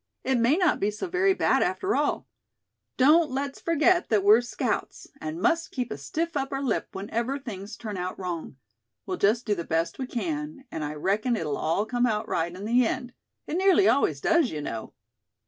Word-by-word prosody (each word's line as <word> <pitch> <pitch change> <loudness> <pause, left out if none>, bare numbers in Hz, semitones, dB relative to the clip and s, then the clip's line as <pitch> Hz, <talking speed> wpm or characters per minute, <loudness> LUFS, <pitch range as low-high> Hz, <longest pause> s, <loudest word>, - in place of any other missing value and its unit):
"It 260 -2 +1
may 240 +7 +3
not 360 -4 +2
be 200 - +1
so 210 - -4
very 375 +2 +2
bad, - - +2
after 395 +1 0
all. - - 0 0.7
Don't 300 +5 +5
let's 275 +1 -3
forget 335 +2 +2
that 210 -3 +2
we're 215 +4 +7
scouts; 240 - -3 0.2
and 155 +2 -4
must 330 - +1
keep 250 -3 -4
a - - -2
stiff 325 - -3
upper 270 -1 -2
lip 265 -5 -1
whenever 230 +7 -2
things 210 -6 -8
turn 210 -4 -6
out 180 0 -4
wrong. 175 -6 -5 0.5
We'll - - -3
just 220 +4 +2
do 210 - +1
the 170 -4 -3
best 165 +5 -1
we 260 - -3
can; 300 +2 -4
and 155 - -4
I 150 +1 -4
reckon 205 - 0
it'll 155 -8 -2
all 165 +7 0
come 245 +2 +1
out 215 -2 -1
right 165 +1 -1
in 185 +3 -8
the 240 +3 +4
end. 245 +2 -2 0.3
It 325 - -3
nearly 390 +1 +5
always 155 - +2
does, 335 -6 +3
you 155 - -5
know." 115 -6 -5
240 Hz, 200 wpm, -26 LUFS, 195-295 Hz, 0.7 s, we're